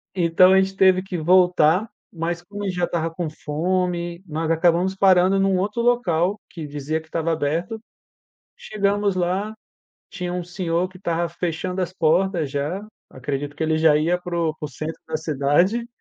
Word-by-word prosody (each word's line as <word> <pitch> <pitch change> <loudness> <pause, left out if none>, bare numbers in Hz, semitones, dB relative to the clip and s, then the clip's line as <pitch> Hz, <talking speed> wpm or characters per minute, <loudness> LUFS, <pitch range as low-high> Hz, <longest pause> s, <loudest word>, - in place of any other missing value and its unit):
Então 180 +1 +5
a 190 - +6
gente 195 0 -2
teve 185 -1 +4
que 185 -1 -5
voltar, 180 +3 +3 0.2
mas 170 +1 -3
como 205 +3 -8
a - - -2
gente 185 - -3
já 180 - -2
estava 165 -1 -2
com 165 -2 -3
fome, 175 +3 -2
nós 160 +1 -2
acabamos 175 +3 +2
parando 190 0 +4
num 195 -1 +2
outro 210 +5 -1
local 205 -6 +1
que 160 -3 -7
dizia 145 +2 -3
que 160 - -17
estava 165 0 -1
aberto, 165 +7 -2 0.8
chegamos 200 -1 0
lá, 185 +4 -1 0.6
tinha 180 -2 -4
um 180 - -2
senhor 175 0 -2
que 185 - -15
estava 170 -2 -1
fechando 180 +2 -3
as 175 - -4
portas 170 -2 +1
já, 150 +8 -3 0.3
acredito 140 +2 -4
que 150 - -5
ele 160 0 +1
já 155 -1 +4
ia 170 +4 +1
para 175 -1 -4
o 160 -2 0
para - - -8
o - - -9
centro 155 +4 -6
da 160 -1 -2
cidade, 160 - +1
175 Hz, 180 wpm, -22 LUFS, 160-185 Hz, 0.8 s, a